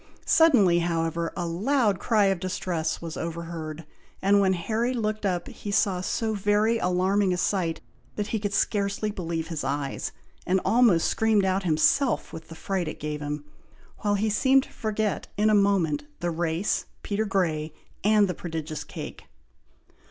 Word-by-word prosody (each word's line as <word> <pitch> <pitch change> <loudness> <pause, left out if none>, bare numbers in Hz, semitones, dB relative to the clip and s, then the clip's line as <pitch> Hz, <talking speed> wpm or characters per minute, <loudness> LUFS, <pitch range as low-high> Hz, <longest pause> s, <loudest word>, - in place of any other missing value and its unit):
Suddenly, 220 - +5
however, 165 -1 -1
a 175 - -1
loud 205 +3 +1
cry 215 -3 +3
of 195 -2 +1
distress 170 -3 -2
was 165 -1 -5
heard - - -4
over 170 0 -4 0.3
head; 165 - -11 0.3
and 200 +1 +4
when 190 -1 +3
Harry 225 +8 -1
looked 215 -2 -1
up, 175 -2 -2
he 205 - -8
saw 200 -3 +1
so 220 +4 -1
very 210 +3 +2
alarming 185 +2 +2
a - - -1
sight, 175 -3 0 0.3
that 210 - -2
he 220 - -1
could 205 0 -2
scarcely 200 +1 0
believe 165 -4 -4
his 160 -3 -3
eyes, 140 -1 -2 0.3
and 185 +2 +2
almost 225 -8 +4
screamed 220 -3 +2
out 190 +1 +1
himself 180 - +2
with 160 0 -8
the 165 - -10
fright 185 0 -2
it 155 - -6
gave 150 0 -4
him, 145 0 -4 0.6
while 205 -1 +1
he 210 +2 0
seemed 265 +5 +4
to - - -15
forget 215 -1 -2
in 215 +1 +3
a - - +3
moment, 200 - +2
the 175 - -1
race, 165 +3 -1 0.2
Peter 210 +1 -1
Grey, 165 -6 0 0.3
and 210 0 +4
the 180 - -2
prodigious 160 -3 -5
cake. - - -8
190 Hz, 170 wpm, -26 LUFS, 165-210 Hz, 0.6 s, Suddenly